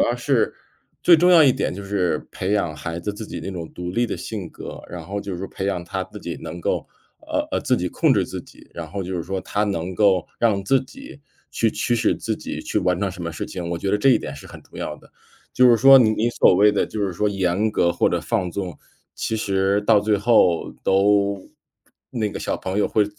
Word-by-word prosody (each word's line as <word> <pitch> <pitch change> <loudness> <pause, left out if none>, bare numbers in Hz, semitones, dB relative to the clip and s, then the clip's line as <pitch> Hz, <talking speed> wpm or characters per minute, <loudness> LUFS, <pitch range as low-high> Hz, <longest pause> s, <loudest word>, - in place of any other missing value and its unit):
要 120 - +2
是 120 -1 +1 0.5
最 175 - +7
重 180 +3 +4
要 170 -3 +8
一 135 - +6
点 - - -2
就 100 - -7
是 100 -3 -1
培 95 +2 -2
养 85 -7 0
孩 80 +2 -5
子 105 +4 -4
自 105 +1 -8
己 - - -6
那 95 - -5
种 85 -4 -6
独 90 0 -5
立 120 +3 +1
的 - - -4
性 100 -6 -6
格， - - -9
然 90 -1 -7
后 100 +1 -4
就 95 -3 -5
是 95 - -5
培 95 - -5
养 90 -3 -2
他， 85 - -3
自 - - -11
己 - - -6
能 85 +2 -7
够 - - -1 0.3
呃， - - -2
呃， - - +1
自 - - +1
己 90 - -2
控 - - +2
制 - - +1
自 - - -6
己， - - -18
然 80 -2 -7
后 100 +2 -4
就 95 +1 -4
是 85 - -2
说， 95 +2 -3
他 105 +2 -2
能 95 -3 -3
够 95 -3 +3
让 105 -4 +2
自 130 +6 +3
己 270 - -12 0.3
去 115 - +1
驱 120 - -1
使 115 - +2
自 - - -2
己 - - -6
去 - - -1
完 90 0 0
成 100 - 0
什 90 -1 -8
么 85 - -3
事 75 - -5
情， 90 -2 -6
我 85 - -2
觉 95 - -3
得 100 - +3
这 105 +6 +2
一 125 - +5
点 70 - -6
是 70 - -12
很 - - -11
重 - - -16
要 - - -4
的。 - - -20 0.4
就 125 -1 +5
是 120 - +6
说， 135 +3 +8
你 115 - +5
你 115 +2 0
所 95 - +4
谓 105 +3 +5
的 - - +1
就 110 - -5
是 95 - -4
说 105 +5 0
严 95 +2 0
格 85 -5 +2
或 - - +2
者 - - 0
放 90 -2 -1
纵， 90 -1 -5 0.4
其 110 - -2
实 100 -1 +1
到 105 0 +4
最 105 0 +1
后 100 -5 +3
都 100 0 +2 0.6
那 110 -3 -2
个 - - -6
小 - - -2
朋 95 +2 -3
友， 105 - +2
会 105 - +2
100 Hz, 270 characters per minute, -22 LUFS, 90-110 Hz, 0.6 s, 要